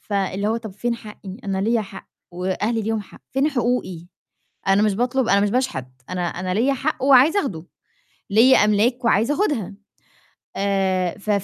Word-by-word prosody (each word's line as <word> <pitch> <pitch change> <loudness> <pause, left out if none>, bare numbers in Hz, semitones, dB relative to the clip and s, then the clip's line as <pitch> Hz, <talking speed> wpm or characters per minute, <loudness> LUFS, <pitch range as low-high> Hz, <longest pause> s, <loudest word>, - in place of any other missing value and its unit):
فاللي 200 0 -1
هو 225 - 0
طب 225 -2 -7
فين 235 +5 -2
حقي؟ 210 -4 -10
أنا 195 -1 -2
ليّا 225 +3 +1
حق، 195 -1 -11 0.2
وأهلي 190 +6 -1
ليهم 220 +1 -1
حق، 205 - -14
فين 270 +3 +2
حقوقي؟ 240 - -2 0.6
أنا 195 +2 +4
مش 210 -2 +2
باطلب 245 +3 0
أنا 200 - +4
مش 205 0 +1
باشحت، 250 - -1 0.2
أنا 180 -1 -2
أنا 180 +1 -3
ليّا 245 +7 +2
حق 270 +3 -3
وعايزة 275 +8 +6
أخده، 180 - -5 0.6
ليّا 240 +6 +6
أملاك 215 +5 +2
وعايزة 230 +5 +2
آخدها. 290 - -1 0.8
آآ، 190 -2 0
ف 210 +1 -5
215 Hz, 165 wpm, -22 LUFS, 195-250 Hz, 0.8 s, وعايزة